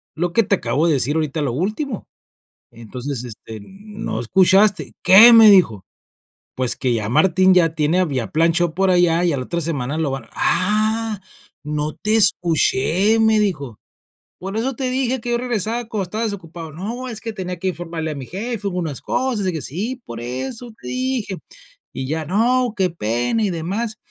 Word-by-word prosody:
lo 175 Hz, +1 st, -2 dB
que 230 Hz, -, +4 dB
te 200 Hz, -, +1 dB
acabo 145 Hz, +4 st, 0 dB
de 160 Hz, -, +3 dB
decir 140 Hz, +4 st, 0 dB
ahorita, 155 Hz, -1 st, -1 dB
lo 135 Hz, -5 st, -1 dB
último, 215 Hz, -, -3 dB, 0.6 s
entonces, 125 Hz, +3 st, -6 dB
este, 110 Hz, -1 st, -10 dB
no 205 Hz, -, -7 dB
escuchaste". 190 Hz, -, +3 dB
"¿Qué?", 225 Hz, +5 st, +9 dB
me 225 Hz, -2 st, +9 dB
dijo, 115 Hz, -, +4 dB, 0.7 s
pues: 125 Hz, -1 st, 0 dB
"Que 125 Hz, -3 st, -1 dB
ya 110 Hz, -2 st, -2 dB
Martín 185 Hz, +6 st, +4 dB
ya 165 Hz, -3 st, +3 dB
tiene 160 Hz, +4 st, +1 dB
había 135 Hz, -10 st, -1 dB
planchó 165 Hz, +1 st, +2 dB
por 190 Hz, +1 st, +2 dB
allá, 175 Hz, -1 st, +3 dB
y 170 Hz, -, +2 dB
a -, -, -1 dB
la 130 Hz, -, -3 dB
otra 170 Hz, -1 st, -3 dB
semana 145 Hz, -3 st, -2 dB
lo 155 Hz, -4 st, -1 dB
van". 135 Hz, -4 st, -5 dB
"Ah, 215 Hz, +2 st, 0 dB, 0.4 s
no 150 Hz, 0 st, -3 dB
te 215 Hz, +1 st, -1 dB
escuché", 180 Hz, +2 st, +3 dB
me 220 Hz, -1 st, +3 dB
dijo, 145 Hz, -, -2 dB, 0.6 s
por 195 Hz, +3 st, -6 dB
eso 260 Hz, +3 st, -1 dB
te 255 Hz, +1 st, -2 dB
dije 260 Hz, 0 st, 0 dB
que 240 Hz, -, -4 dB
yo 240 Hz, -, +2 dB
regresaba 235 Hz, -1 st, -2 dB
cuando 215 Hz, -3 st, -3 dB
estaba 215 Hz, +5 st, -4 dB
desocupado. 170 Hz, -6 st, -7 dB
No, 230 Hz, -, -6 dB
es 220 Hz, -2 st, -7 dB
que 225 Hz, -1 st, -5 dB
tenía 180 Hz, -2 st, -5 dB
que 190 Hz, -, -1 dB
informarle 165 Hz, -2 st, -5 dB
a -, -, -5 dB
mi 130 Hz, -3 st, -8 dB
jefe, 210 Hz, +2 st, -4 dB
hubo 180 Hz, -2 st, -3 dB
unas 155 Hz, -6 st, -4 dB
cosas, 245 Hz, -7 st, -1 dB
y 185 Hz, -, +1 dB
que 160 Hz, -, -4 dB
sí, 220 Hz, -, -4 dB
por 115 Hz, 0 st, -8 dB
eso 130 Hz, -, -6 dB
te -, -, -10 dB
dije, 255 Hz, -7 st, -2 dB, 0.6 s
y 130 Hz, -, -5 dB
ya 160 Hz, +2 st, -2 dB
no, 235 Hz, -, +1 dB
qué 185 Hz, -2 st, +1 dB
pena 120 Hz, -, -1 dB
y 200 Hz, -, +1 dB
demás. 200 Hz, +7 st, -3 dB
180 Hz, 185 wpm, -20 LUFS, 150-215 Hz, 0.7 s, Qué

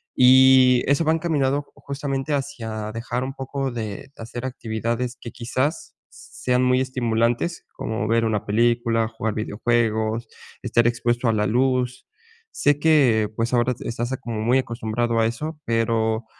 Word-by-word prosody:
Y 130 Hz, 0 st, +6 dB
eso 140 Hz, +4 st, +2 dB
va 160 Hz, -, +3 dB
encaminado 145 Hz, -4 st, 0 dB
justamente 140 Hz, +1 st, -4 dB
hacia 115 Hz, -6 st, -4 dB
dejar 120 Hz, +2 st, -3 dB
un 135 Hz, +1 st, -4 dB
poco 135 Hz, 0 st, -4 dB
de 110 Hz, +1 st, -6 dB
hacer 120 Hz, +2 st, -7 dB
actividades 120 Hz, 0 st, -3 dB
que 115 Hz, -, -7 dB
quizás, 130 Hz, +6 st, -3 dB
sean 125 Hz, 0 st, -2 dB
muy 125 Hz, 0 st, +3 dB
estimulantes, 120 Hz, +4 st, -1 dB
como 110 Hz, -1 st, -3 dB
ver 115 Hz, 0 st, +2 dB
una 110 Hz, -2 st, -1 dB
película, 115 Hz, +1 st, +1 dB
jugar 110 Hz, -1 st, -3 dB
videojuegos, 110 Hz, +1 st, 0 dB, 0.4 s
estar 120 Hz, 0 st, +2 dB
expuesto 120 Hz, 0 st, 0 dB
a 110 Hz, -, +2 dB
la 105 Hz, -1 st, +1 dB
luz. 125 Hz, +1 st, 0 dB, 0.5 s
Sé 145 Hz, 0 st, +1 dB
que, 135 Hz, -9 st, +4 dB
pues, 115 Hz, +2 st, -1 dB
ahora 125 Hz, +1 st, +2 dB
estás 120 Hz, +2 st, -3 dB
como 115 Hz, -3 st, -4 dB
muy 120 Hz, +4 st, +3 dB
acostumbrado 115 Hz, -1 st, -1 dB
a 110 Hz, -, +3 dB
eso, 150 Hz, +7 st, -5 dB
pero 115 Hz, -1 st, 0 dB
120 Hz, 145 wpm, -23 LUFS, 115-130 Hz, 0.5 s, Y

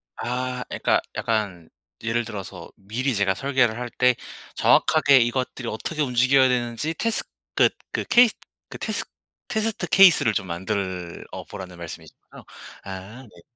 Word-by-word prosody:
아 125 Hz, +1 st, -3 dB
그러니까 -, -, +1 dB
약간 100 Hz, -7 st, -2 dB, 0.3 s
예를 115 Hz, +1 st, 0 dB
들어서 95 Hz, -5 st, -8 dB
미리 115 Hz, +6 st, -2 dB
제가 100 Hz, -1 st, +2 dB
설계를 130 Hz, -1 st, +1 dB
할 125 Hz, 0 st, -4 dB
때 125 Hz, -1 st, +4 dB, 0.4 s
정확하게 145 Hz, -3 st, +5 dB
이것들이 125 Hz, +1 st, -1 dB
어떻게 150 Hz, +8 st, -3 dB
움직여야 130 Hz, 0 st, +4 dB
되는지 125 Hz, +5 st, -1 dB
테스 230 Hz, +7 st, 0 dB, 0.3 s
그 -, -, +5 dB, 0.2 s
그 -, -, -2 dB
케이 240 Hz, 0 st, +6 dB, 0.4 s
그 -, -, -8 dB
테스 -, -, -2 dB, 0.4 s
테스트 220 Hz, 0 st, -2 dB
케이스를 175 Hz, -, +6 dB
좀 95 Hz, -, -1 dB
만들어 95 Hz, -1 st, -4 dB, 0.2 s
보라는 95 Hz, -3 st, -8 dB
말씀이신 85 Hz, -2 st, -9 dB, 0.2 s
거죠? -, -, -13 dB, 0.4 s
아 100 Hz, +6 st, -8 dB
네. 90 Hz, -8 st, -17 dB
120 Hz, 310 characters per minute, -24 LUFS, 100-130 Hz, 0.4 s, 케이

